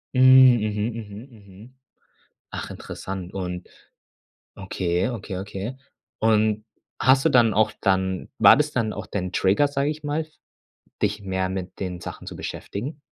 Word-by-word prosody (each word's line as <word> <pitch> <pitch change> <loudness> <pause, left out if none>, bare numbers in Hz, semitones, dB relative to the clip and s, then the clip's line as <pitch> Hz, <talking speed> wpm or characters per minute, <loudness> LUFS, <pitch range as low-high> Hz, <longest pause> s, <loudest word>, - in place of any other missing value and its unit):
Hm, 130 - +3 0.4
mhm, 105 0 -1
mhm, 105 -3 -8
mhm. 105 +2 -16 0.7
Ach, - - -6
interessant 95 -1 -7
und 90 -1 -5 0.9
okay, 90 -1 -1
okay, 110 -6 -5
okay. 100 +6 -5 0.4
Und 110 -1 +2 0.4
hast 130 +1 +5
du - - +4
dann 115 -4 +4
auch 110 +1 +3
dann 95 -2 0
war - - +8
das 150 0 +1
dann 115 -4 0
auch - - -6
dein 90 -2 -3
Trigger, 100 +12 +2
sage 140 +1 0
ich 155 0 -8
mal, 145 +2 -1
f 155 - -20 0.7
dich 105 0 0
mehr 95 -1 -2
mit 95 0 -6
den 90 -2 -4
Sachen - - -8
zu - - -8
beschäftigen? 140 +9 -6
105 Hz, 150 wpm, -24 LUFS, 95-120 Hz, 0.9 s, war